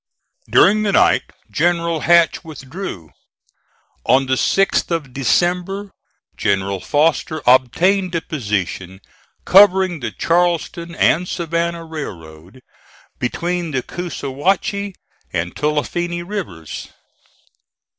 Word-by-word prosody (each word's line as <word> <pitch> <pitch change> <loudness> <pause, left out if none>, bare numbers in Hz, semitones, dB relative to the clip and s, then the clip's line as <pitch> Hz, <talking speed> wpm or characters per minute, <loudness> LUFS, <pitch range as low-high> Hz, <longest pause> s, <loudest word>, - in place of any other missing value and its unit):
During 215 +2 +5
the 205 -2 0
night - - +4 0.3
General 170 0 +1
Hatch 170 +2 +3
withdrew. 140 - -8 0.9
On 135 +1 +3
the 130 - 0
6th 195 - +2
of 155 -7 -3
December 180 - 0 0.4
General 100 0 0
Foster 155 - 0
obtained 175 +10 +3
a 165 - 0
position 100 - -3 0.5
covering 190 -3 +5
the 120 -4 -3
Charleston 170 - 0
and 175 +3 +2
Savannah 170 0 -2
Railroad, 90 - -9 0.6
between 170 +7 -2
the 130 -4 -2
Coosawhatchie 180 +4 -2 0.4
and 85 +1 -3
Tulifinny 170 +3 -1
rivers. 95 - -6
165 Hz, 95 wpm, -19 LUFS, 130-180 Hz, 0.9 s, During